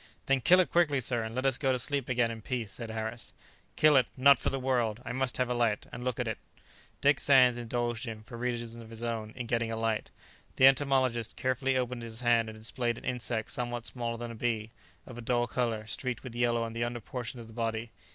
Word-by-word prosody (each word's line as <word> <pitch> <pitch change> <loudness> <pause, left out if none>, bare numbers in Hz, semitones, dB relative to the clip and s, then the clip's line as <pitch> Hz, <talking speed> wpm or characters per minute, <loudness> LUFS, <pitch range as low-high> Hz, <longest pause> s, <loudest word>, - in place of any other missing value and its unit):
"Then 135 -1 +2
kill 180 +8 +6
it 185 - +2
quickly, 155 -5 +3
sir; 120 -1 -1
and 110 +1 -5
let 130 +1 -1
us 135 -2 +2
go 135 -2 +2
to 130 - +1
sleep 140 +1 -1
again 120 -2 +2
in 115 -1 -7
peace," 115 -3 -3
said 115 -2 -6
Harris. 110 +1 -5 0.4
"Kill 155 -1 +5
it! 130 - +4
not 140 +2 +7
for - - 0
the 135 - -2
world! 120 -4 0
I - - -3
must 130 -1 -1
have 125 - +1
a 125 - 0
light, 115 -3 +1
and 125 - -7
look 125 -1 -2
at 125 - -1
it!" 110 - -3 0.6
Dick 140 +1 +4
Sands 130 -3 +6
indulged 120 0 -2
him, 110 -1 -6
for 120 +2 -10
reasons 120 -1 -3
of 115 -1 -10
his 115 0 -7
own, 115 -2 -2
in 125 -1 -4
getting 115 -1 0
a - - -1
light. 110 -1 -1 0.5
The 130 - +6
entomologist 130 -4 +3
carefully 130 +1 0
opened 125 -1 -2
his 115 0 -6
hand 120 -2 +3
and 110 - -9
displayed 120 +1 -1
an - - -11
insect 120 -3 -2
somewhat 120 -3 -3
smaller 120 -2 -3
than 120 0 -5
a - - -8
bee, 110 -1 -2 0.3
of 120 -2 -9
a - - -6
dull 120 +1 +1
colour, 115 -2 -1
streaked 125 +3 -3
with 130 -3 -7
yellow 120 -1 +1
on 115 -1 -4
the 115 +1 -1
under 120 0 -2
portion 120 +2 -6
of 115 - -8
the 110 - -13
body. 115 0 -2
120 Hz, 240 wpm, -30 LUFS, 115-130 Hz, 0.6 s, not